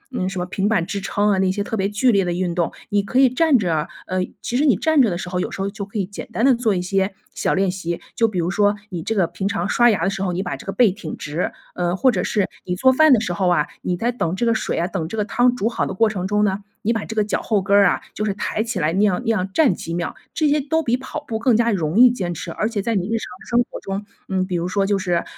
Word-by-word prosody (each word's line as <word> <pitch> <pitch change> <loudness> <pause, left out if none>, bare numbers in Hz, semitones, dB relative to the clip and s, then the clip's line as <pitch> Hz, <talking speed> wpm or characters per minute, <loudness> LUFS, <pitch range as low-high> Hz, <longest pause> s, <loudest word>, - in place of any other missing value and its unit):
嗯， 185 -5 -1
什 190 - -6
么 180 - -1
平 195 +2 -1
板 205 -7 +1
支 200 +2 -4
撑 205 +1 +1
啊， 195 - +2
那 190 -1 +2
些 200 +2 -2
特 225 - -4
别 195 -2 0
剧 225 +5 +2
烈 200 -3 +3
的 175 - -1
运 175 0 -1
动， 170 -1 0 0.2
你 205 0 +2
可 200 +6 -3
以 270 - +7
站 275 +3 +3
着 165 -6 0 0.2
呃， 185 - -2 0.2
其 245 - -1
实 280 - +2
你 275 -8 +4
站 315 - +3
着 235 - +4
的 175 - -2
时 180 - -6
候， 180 0 -2
有 - - -2
时 - - -8
候 195 +1 -1
就 200 -1 -6
可 200 +2 -8
以 195 - 0
简 200 +2 -8
单 230 - 0
地 270 - +6
做 230 -4 +1
一 180 - -1
些 195 +1 0 0.2
小 - - 0
练 190 -1 +2
习， 170 -2 -4 0.2
就 230 - +3
比 210 -4 -4
如 175 +1 0
说 205 +1 +2
你 175 -3 -5
这 225 - -2
个 190 -4 +3
平 190 +3 -4
常 180 -3 -1
刷 240 +4 +4
牙 195 -7 +1
的 195 - +2
时 190 - -4
候， 190 -2 0
你 185 +2 -2
把 180 - -3
这 - - -12
个 - - -1
背 230 -1 +4
挺 185 -5 -7
直， 155 +4 -3 0.2
呃， 175 0 -1
或 255 +6 +4
者 - - -1
是 205 -4 0 0.2
你 180 - -2
做 260 +8 +4
饭 315 +3 +5
的 250 - +6
时 195 -5 -2
候 180 +1 +1
啊， 160 -4 +3 0.2
你 180 - -2
在 235 +6 0
等 185 -8 -2
这 235 - -1
个 230 - +3
水 220 - -2
啊 170 - +1
等 175 -3 -3
这 220 - -6
个 210 - 0
汤 245 +3 +2
煮 225 -3 -1
好 235 - -1
的 190 - -5
过 225 +3 +3
程 190 -3 -3
中 210 +1 +1
呢， 195 -1 0 0.2
你 230 - +2
把 225 -2 -3
这 220 - -7
个 215 - +3
脚 210 - -2
后 215 -3 +1
跟 200 +1 +2
儿 200 -1 +6
啊， - - +1
就 215 - -3
是 205 -2 -1
抬 210 - -2
起 225 -3 -2
来 160 -1 +1
那 190 - +1
样 205 -4 +3
那 230 - +2
样 190 -3 -1
站 270 - +4
几 165 0 -5
秒， 175 0 -3 0.2
这 310 - +2
些 295 0 +2
都 320 +4 0
比 240 -3 +1
跑 260 +4 -6
步 220 -1 -2
更 240 -2 +3
加 235 0 +2
容 170 0 0
易 250 0 +8
坚 185 -7 -3
持。 170 - -6
而 215 +6 -1
且 210 -4 -2
在 230 +1 0
你 190 -3 0
日 230 +1 0
常 220 - -6 0.2
生 240 +1 +3
活 - - -7
中， 195 +1 -4 0.2
嗯， 190 -1 0
比 185 -1 -3
如 170 0 -1
说 195 +1 +1
就 200 0 +1
是， 180 -3 0
200 Hz, 340 characters per minute, -21 LUFS, 180-230 Hz, 0.2 s, 易